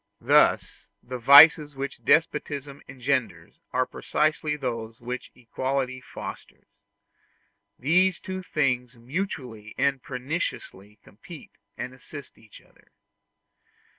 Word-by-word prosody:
Thus - - +2 0.2
the 125 0 -6
vices 145 +3 +8
which 135 +1 -6
despotism 145 -3 0
engenders 120 -10 -3
are - - +1
precisely 155 0 -1
those 115 -5 -5
which 125 +1 -6
equality 130 +1 -3
fosters. - - -10 1.1
These 180 +6 +2
two 185 -1 -6
things 130 -7 -1
mutually 125 - -6
and 135 -1 +1
perniciously 125 - -5
complete 150 - -13 0.3
and 125 0 -6
assist 140 +2 -12
each 110 -1 -17
other. - - -27
135 Hz, 100 wpm, -25 LUFS, 125-150 Hz, 1.1 s, vices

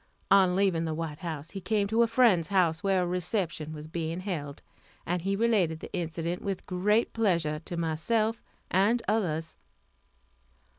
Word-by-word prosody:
On 190 -2 +5
leaving 185 -4 +2
the 160 -1 -2
White 155 -2 -4
House 160 -3 -5
he 195 - -6
came 210 0 +1
to 220 +3 +2
a 235 - +5
friend's 225 -8 +4
house 175 -5 +2
where 190 -2 +2
a - - 0
reception 175 -3 -2
was 155 0 -8
being 165 +2 -3
held, 150 -7 -5 0.4
and 175 +1 -1
he 195 +3 0
related 195 -8 +2
the - - -10
incident 170 0 -3
with 195 -2 -4
great 205 +5 +1
pleasure 170 -9 +1
to 175 - -5
myself 215 +8 0 0.3
and 210 +6 +3
others. 165 -7 -1
180 Hz, 160 wpm, -28 LUFS, 160-200 Hz, 0.4 s, On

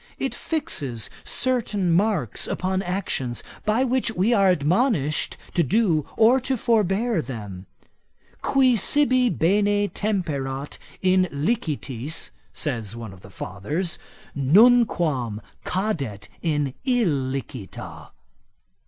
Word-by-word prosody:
It - - -2
fixes 150 - -2
certain 225 -8 +1
marks 180 - +1
upon 185 +1 -1
actions, 175 -10 -2 0.2
by 220 +4 +3
which 260 -1 +1
we 200 +7 +2
are 195 -4 +4
admonished 165 - +1 0.2
to 175 - +3
do 170 - +2
or 240 +4 +5
to 260 +1 -1
forbear 215 -2 +1
them. 100 -9 -7 0.7
Qui 260 -2 +3
sibi 255 0 +3
bene 205 +3 +2
temperat 145 -10 -3 0.2
in 185 0 +4
licitis, 145 - -2 0.2
says 115 -7 -3
one 115 -4 -7
of 95 - -15
the 100 - -13
fathers, 145 - -3 0.4
nunquam 155 - +4 0.3
cadet 160 - -2
in 150 -5 0
illicita. 135 - -2
180 Hz, 100 wpm, -24 LUFS, 135-220 Hz, 0.7 s, or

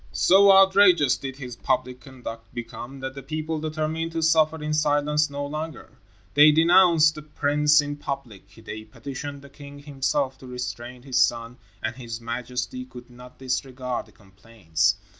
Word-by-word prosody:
So 195 +2 +6
outrageous 190 -7 +5
did 135 -1 -7
his 130 -3 -8
public 125 +1 -2
conduct 115 -4 -10
become 120 +3 -8
that 130 0 -5
the 135 - -8
people 155 +3 -4
determined 155 +1 -3
to 165 -1 -2
suffer 160 0 +3
in 150 0 -2
silence 150 0 +1
no 145 0 -4
longer. 155 +2 -6 0.4
They 150 +1 +7
denounced 165 0 +5
the 150 - -9
prince 150 0 +2
in 145 0 -5
public, 120 -9 -7
they 110 -1 -8
petitioned 140 +5 -8
the 140 - -13
king 140 0 -12
himself 135 -1 -2
to 130 - -12
restrain 125 0 -7
his 130 -1 -1
son, 120 0 0 0.3
and 110 +2 -2
his 120 -3 -7
majesty 125 +2 -4
could 125 -1 -13
not 125 +1 -14
disregard 130 -1 -4
the - - -20
complaints. 95 -3 -2
135 Hz, 160 wpm, -24 LUFS, 125-150 Hz, 0.4 s, They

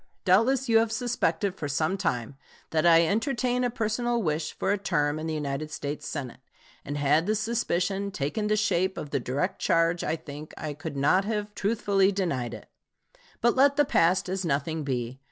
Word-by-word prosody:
Doubtless 235 +8 +3
you 225 -1 +5
have 225 0 +1
suspected 215 -6 0
for 155 -6 -5
some 155 +6 0
time 135 - -2 0.4
that 160 +1 +2
I 165 0 +6
entertain 245 - 0
a 245 - +2
personal 235 +1 -1
wish 155 -1 -1
for - - 0
a 205 - +2
term 150 -6 0
in 160 - -4
the 160 - -2
United 150 0 -3
States 150 0 -5
Senate; 135 -5 -5 0.4
and 145 +1 -4
had 145 +4 +2
the 215 - +2
suspicion 200 -3 -1
taken 195 +6 -2
the 215 - +2
shape 190 -3 +1
of 150 - -6
the - - +1
direct 140 +10 -2
charge 165 +1 +2
I 160 - 0
think 150 -1 -10
I 155 -1 -4
could 145 0 -7
not 150 +8 +3
have 210 -1 -3
truthfully 200 -2 +2
denied 140 - -2
it. - - -12 0.7
But 240 - +3
let 280 +2 +5
the 290 0 +4
past 180 -5 +2
as 190 +1 -2
nothing 155 0 -1
be. 125 -2 -3
175 Hz, 190 wpm, -27 LUFS, 150-215 Hz, 0.7 s, I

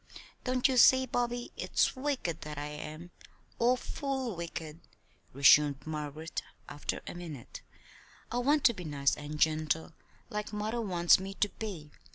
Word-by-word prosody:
"Don't 255 0 +2
you 260 -2 0
see, 260 +2 +7
Bobby, 240 -1 -2
it's - - +1
wicked 260 - -2
that 150 0 -7
I 145 - -3
am 155 +3 -8 0.5
awful 255 0 0
wicked," 165 -2 -6 0.5
resumed 140 0 +5
Margaret, 155 +1 -4 0.3
after 145 - -4
a - - -6
minute. 165 -8 -8 0.7
"I 245 - 0
want 285 +4 +3
to 235 - +6
be 185 -4 -8
nice 140 -3 +1
and 150 +1 -7
gentle 155 +1 +1 0.4
like 210 -1 -3
mother 215 +3 -2
wants 175 -5 +4
me 195 +1 -6
to 205 - +1
be. 180 -11 -7
175 Hz, 145 wpm, -31 LUFS, 150-240 Hz, 0.7 s, see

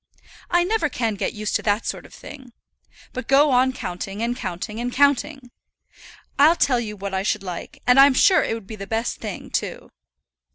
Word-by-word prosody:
"I 350 0 +3
never 375 -4 0
can 230 -5 -1
get 200 - -3
used 215 0 -3
to - - -9
that 210 +1 0
sort - - -5
of - - -20
thing; 260 -4 -12 0.6
but 255 -2 -6
go 285 +2 +5
on 255 +1 +3
counting, 195 -1 -5
and 240 +1 -1
counting, 205 0 -5
and 245 +1 -2
counting. 280 -1 +1 0.9
I'll 310 +4 +6
tell 255 -7 +2
you 210 -3 -5
what 200 0 -6
I 190 - 0
should 210 0 -1
like; 180 -3 -8
and 250 +2 +5
I'm 275 -1 +7
sure 375 +7 +5
it 225 - -2
would 225 -3 -9
be 220 - -8
the 195 -1 -8
best 225 +3 -2
thing, - - -7
too." - - -4
240 Hz, 200 wpm, -22 LUFS, 210-275 Hz, 0.9 s, I'm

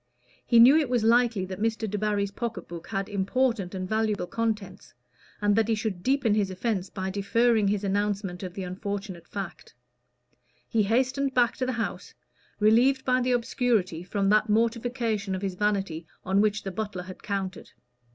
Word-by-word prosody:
He 235 - +3
knew 245 +5 +9
it 300 -5 +1
was 245 -3 +1
likely 230 -3 +3
that 185 +1 -7
Mr. 220 0 -1
Debarry's 205 -1 -1
pocket 230 +1 -5
book 170 0 -8
had 195 -2 -2
important 205 -1 0
and 185 0 -3
valuable 215 -2 0
contents, 210 -2 -4 0.5
and 205 0 +3
that 225 0 +2
he 225 - +2
should 215 -4 -3
deepen 260 -1 +2
his 205 -2 +1
offence 190 0 -2
by 190 0 -4
deferring 220 +2 +2
his 205 0 0
announcement 200 -2 -1
of 185 -2 -6
the 195 - -4
unfortunate 190 0 -5
fact. 195 -4 -7 0.9
He 225 - +1
hastened 260 +5 +1
back 245 -2 +3
to 255 - -1
the 260 - -1
house, 230 -1 -4 0.4
relieved 245 +5 +4
by 255 0 +2
the 250 0 +1
obscurity 230 -8 0
from 195 +2 -1
that 215 +1 +3
mortification 230 -2 0
of 185 - -5
his 195 -1 -1
vanity 190 -5 -1 0.2
on 195 +2 +3
which 215 0 +1
the 195 - -4
butler 195 -2 -4
had 185 0 -10
counted. 195 -3 -4
210 Hz, 170 wpm, -27 LUFS, 195-230 Hz, 0.9 s, knew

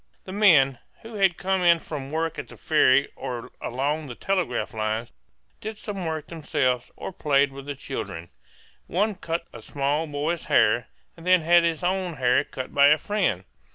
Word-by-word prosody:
The 185 - -9
men, 155 - +5 0.2
who 225 +1 -10
had 195 -4 +2
come 190 0 0
in 170 -1 +6
from 145 -4 -7
work 160 +1 -2
at - - -6
the - - -13
ferry 140 -3 +3
or 125 -3 -6
along 145 +5 -2
the 120 - -7
telegraph 190 -5 -1
lines, 110 +1 -2 0.5
did 220 -1 -6
some 200 -5 -5
work 160 -1 -3
themselves, 130 -7 -1
or - - -7
played 140 -4 +2
with 135 +1 -10
the 145 - -4
children; 100 -11 -6 0.6
one 210 +5 +1
cut 170 -2 -4
a - - -9
small 145 +3 -1
boy's 150 +3 -2
hair, - - +3 0.3
and 165 - -14
then 180 0 +4
had 170 +2 +5
his 165 +1 -1
own 180 -1 -1
hair 125 -3 +3
cut 130 - -7
by 140 0 +6
a 150 +1 +6
friend. 185 - -1
155 Hz, 180 wpm, -25 LUFS, 135-180 Hz, 0.6 s, in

